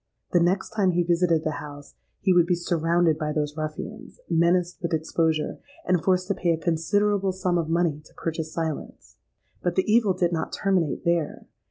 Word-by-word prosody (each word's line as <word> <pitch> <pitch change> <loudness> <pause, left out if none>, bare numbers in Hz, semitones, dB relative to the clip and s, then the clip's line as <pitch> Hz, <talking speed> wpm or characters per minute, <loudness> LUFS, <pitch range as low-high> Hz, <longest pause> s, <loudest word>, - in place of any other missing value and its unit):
The 175 - +4
next 180 +5 +1
time 200 -4 +2
he 175 0 +2
visited 170 -2 +2
the 155 -2 -2
house, 145 -1 -10 0.3
he 190 - +3
would 175 -1 +4
be 180 - +3
surrounded 170 -1 +1
by 155 -1 -1
those 150 -1 -2
ruffians, 155 -1 -6
menaced 170 +1 +2
with 170 -2 -2
exposure, 160 0 0 0.3
and 180 -2 +1
forced 185 -1 +2
to - - +3
pay 180 - -1
a - - -1
considerable 190 +5 +1
sum 180 -1 0
of 160 -1 -2
money 165 -3 +1
to - - -19
purchase 160 -1 -4
silence. 160 -3 -5 0.4
But 175 -1 -1
the 190 - +2
evil 215 -3 +3
did 175 -1 +1
not 160 - -2
terminate 185 -7 0
there. 170 -3 0
170 Hz, 185 wpm, -25 LUFS, 160-185 Hz, 0.4 s, The